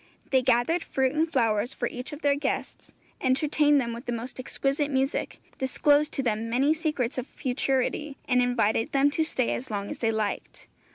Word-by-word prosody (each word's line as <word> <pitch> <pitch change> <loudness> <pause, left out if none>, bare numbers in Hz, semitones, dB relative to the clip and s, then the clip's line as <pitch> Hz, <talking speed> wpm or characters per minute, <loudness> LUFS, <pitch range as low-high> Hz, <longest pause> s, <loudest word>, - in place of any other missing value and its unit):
They 260 -1 +4
gathered 255 +7 +2
fruit 265 -1 0
and 320 +1 +1
flowers 230 -3 +1
for 240 - -1
each 250 +4 -6
of 295 +1 -9
their 285 -1 +4
guests, 280 -1 -3 0.3
entertained 290 +2 +3
them 235 -3 -2
with 235 +2 -9
the - - -1
most 240 +2 -5
exquisite 275 +2 -1
music, 270 0 -1 0.2
disclosed 290 +3 +3
to 270 - -1
them 225 -1 -1
many 270 +6 +3
secrets 300 -6 -1
of 255 - -5
futurity, 270 +2 -1
and 250 -1 +3
invited 230 -3 +1
them 280 +1 +4
to 320 +2 +1
stay 260 -5 0
as 260 - -4
long 205 -2 -3
as - - -6
they 225 -1 +1
liked. 215 -2 -3
260 Hz, 185 wpm, -27 LUFS, 240-290 Hz, 0.3 s, They